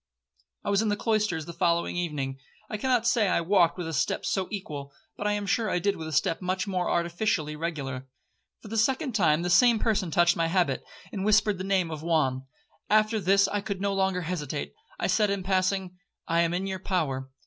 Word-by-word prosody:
'I - - -1
was 200 +1 +3
in 220 - 0
the 205 - +1
cloisters 210 -7 0
the 170 - -8
following 170 +1 +1
evening. 145 -6 -3 0.3
I 215 - -2
cannot 245 0 +1
say 230 -3 +3
I 180 - +2
walked 175 -1 +3
with 175 -2 -4
a 165 - -4
step 135 - -1
so 190 -2 0
equal, 150 -9 -6 0.2
but 205 - -3
I 210 - +2
am 205 0 -2
sure 220 +2 0
I - - +1
did 200 +3 0
with 160 - -6
a - - -5
step 165 +3 +1
much 185 +1 -1
more 185 -3 -1
artificially 170 -3 0
regular. 140 -5 -4 0.6
For 215 - -10
the 225 - -3
second 265 +5 +1
time 170 -6 +3
the 175 - -1
same 240 +4 +6
person 210 -5 0
touched 175 +2 +3
my 165 0 +1
habit, 165 -6 +1 0.3
and 195 -3 -4
whispered 210 -2 +3
the - - -3
name 190 -3 +1
of 155 -1 -5
Juan. 135 -6 0 0.4
After 215 +1 +3
this 195 +1 +4
I 205 - -1
could 200 -2 -4
no 200 0 0
longer 190 -1 0
hesitate. 155 -4 -4 0.3
I - - -1
said, 210 -2 +2
in 200 -1 -2
passing, 185 -1 0 0.3
'I 165 +1 +2
am 170 0 +1
in 185 +2 -2
your 190 -1 -3
power.' 145 -9 -2
185 Hz, 215 wpm, -27 LUFS, 165-205 Hz, 0.6 s, same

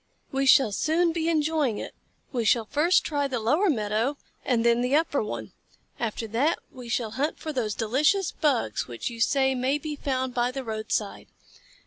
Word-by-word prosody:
"We 270 0 0
shall 260 -4 +6
soon 330 - +1
be 325 0 -1
enjoying 305 -7 +1
it. - - -6 0.4
We 245 -3 -1
shall 225 +1 +3
first 315 +10 +3
try 285 -2 -1
the 255 -3 -2
lower 300 - +2
meadow 225 +2 0 0.3
and 235 -3 +1
then 235 0 +4
the 250 +3 +1
upper 310 -2 +2
one. 210 - -5 0.5
After 230 0 -2
that 275 +10 +1
we 250 -2 -10
shall 225 -1 -1
hunt 285 +7 -1
for 310 - -5
those 220 -6 -1
delicious 300 - +1
Bugs 255 - 0
which 120 - -5
you 230 -1 -7
say 265 +2 +3
may 260 +3 0
be 300 0 -5
found 260 -3 -2
by 240 0 +1
the 265 +1 -5
roadside. 215 -2 -3
260 Hz, 180 wpm, -26 LUFS, 230-295 Hz, 0.5 s, shall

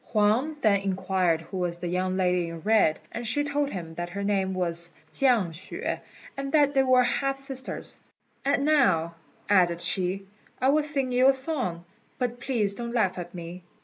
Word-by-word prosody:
Huang 230 +8 +2
then 205 -3 +4
inquired 185 -3 0
who 185 +4 -7
was 175 -1 -1
the 175 - -5
young 185 +1 -1
lady 180 -2 +1
in 165 -1 -8
red, 210 -6 +3
and 235 0 -4
she 290 +6 +2
told 285 0 0
him 170 -7 -6
that 175 +1 -4
her 200 +3 -4
name 195 -2 0
was 170 -1 -1 0.2
Chiang 240 -9 +3
hsüeh, 165 +3 -4 0.4
and 275 -1 -4
that 290 -2 +4
they 270 - +4
were 255 -1 +5
half 270 +2 0
sisters; 270 -1 -4 0.4
"and 280 0 +1
now," 235 - +3 0.3
added 175 -4 +3
she, 185 +2 -1 0.3
"I 260 - +3
will 305 +2 +4
sing 280 -4 -1
you 255 +2 +5
a - - +5
song; 260 - -2 0.3
but 245 -1 -2
please 230 -6 0
don't 235 +2 -5
laugh 190 -6 +1
at 175 0 -7
me." 175 +1 -7
205 Hz, 180 wpm, -27 LUFS, 180-265 Hz, 0.4 s, were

